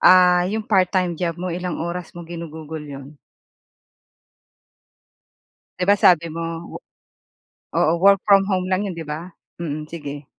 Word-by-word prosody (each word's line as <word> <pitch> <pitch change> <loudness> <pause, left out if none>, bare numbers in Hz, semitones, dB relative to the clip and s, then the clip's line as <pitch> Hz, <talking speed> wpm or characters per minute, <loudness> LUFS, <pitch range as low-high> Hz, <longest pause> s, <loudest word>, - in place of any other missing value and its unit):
Ah, 180 -1 +6
'yong 215 +2 -2
part-time 185 -3 +2
job 170 0 -2
mo 180 0 -4
ilang 180 0 -3
oras 170 +1 -4
mo 175 - -7
ginugugol 160 -2 -7
'yon? 140 -1 -9 2.7
'Di 180 - 0
ba 205 - +7
sabi 170 -2 +6
mo 165 0 -3 0.3
wo - - -7 1.0
oo, 160 - +3
work 200 0 +6
from 200 -1 +6
home 185 -2 0
lang 185 +2 +1
'yon 185 - -5
'di 165 -1 -6
ba? 160 +4 -7 0.3
Mm, 155 -2 -4
sige. 145 -3 -7
175 Hz, 145 wpm, -22 LUFS, 160-185 Hz, 2.7 s, ba